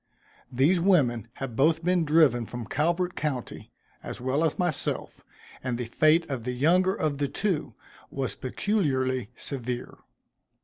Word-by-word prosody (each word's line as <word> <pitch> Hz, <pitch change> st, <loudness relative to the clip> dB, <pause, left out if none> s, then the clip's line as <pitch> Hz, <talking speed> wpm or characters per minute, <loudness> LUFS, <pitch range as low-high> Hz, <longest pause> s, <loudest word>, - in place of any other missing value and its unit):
These 145 Hz, +9 st, +3 dB
women 140 Hz, -, +2 dB
had 135 Hz, -4 st, -6 dB
both 160 Hz, +5 st, +3 dB
been 180 Hz, -1 st, +2 dB
driven 145 Hz, -7 st, +4 dB
from 120 Hz, -1 st, -6 dB
Calvert 170 Hz, -, 0 dB
county, 135 Hz, -5 st, -4 dB, 0.3 s
as -, -, -7 dB
well 130 Hz, +5 st, 0 dB
as 160 Hz, -, +1 dB
myself, 175 Hz, -5 st, -2 dB, 0.4 s
and 125 Hz, -2 st, -2 dB
the 125 Hz, -, -3 dB
fate 155 Hz, +8 st, +3 dB
of 135 Hz, -4 st, -3 dB
the 125 Hz, +2 st, -3 dB
younger 180 Hz, +9 st, +3 dB
of 145 Hz, -2 st, -1 dB
the 145 Hz, -, +1 dB
two, 180 Hz, +1 st, -2 dB, 0.3 s
was 135 Hz, -2 st, -3 dB
peculiarly 130 Hz, -, -1 dB
severe. 125 Hz, -2 st, -5 dB
145 Hz, 140 wpm, -27 LUFS, 125-170 Hz, 0.4 s, driven